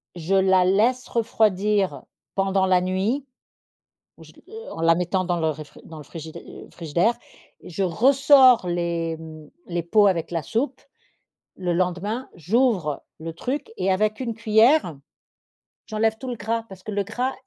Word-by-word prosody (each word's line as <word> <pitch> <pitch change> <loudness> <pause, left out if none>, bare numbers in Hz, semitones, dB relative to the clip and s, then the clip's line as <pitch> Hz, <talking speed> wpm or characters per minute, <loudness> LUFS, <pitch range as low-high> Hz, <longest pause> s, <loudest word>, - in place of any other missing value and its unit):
je 175 +3 -1
la 190 -1 +4
laisse 225 +7 +2
refroidir 210 -3 +1 0.3
pendant 195 0 +1
la 180 -1 +3
nuit, 195 +9 -1 0.9
ou - - -16
je - - -16
l - - -21 0.3
en - - -7
la 165 0 +4
mettant 180 +2 -1
dans 175 -1 -1
le 160 - +1
réfri 155 0 -10
dans 160 - -11
le 150 - -10
frigidai 160 +1 -10
frigidaire 175 +8 0 0.4
et - - -12
je 195 - -3
ressors 255 - +5
les, 170 -1 -2
mmh, 155 -1 -11 0.2
les 175 -1 -2
pots 205 +5 +4
avec 170 -4 0
la 165 -2 -2
soupe, 255 - -2 0.8
le 180 -2 -1
lendemain. 185 +7 -2
J'ouvre 185 - 0 0.2
le 165 +1 -6
truc 260 - -4
et 190 +1 +1
avec 215 +3 0
une 235 -2 -2
cuillère, 225 - +3 0.9
j'enlève 220 0 0
tout 260 - -6
le 245 - -3
gras 225 +2 -2
parce 185 -1 -12
que 215 - -6
le 200 -1 -1
gras 245 +6 -2
190 Hz, 160 wpm, -23 LUFS, 170-225 Hz, 0.9 s, ressors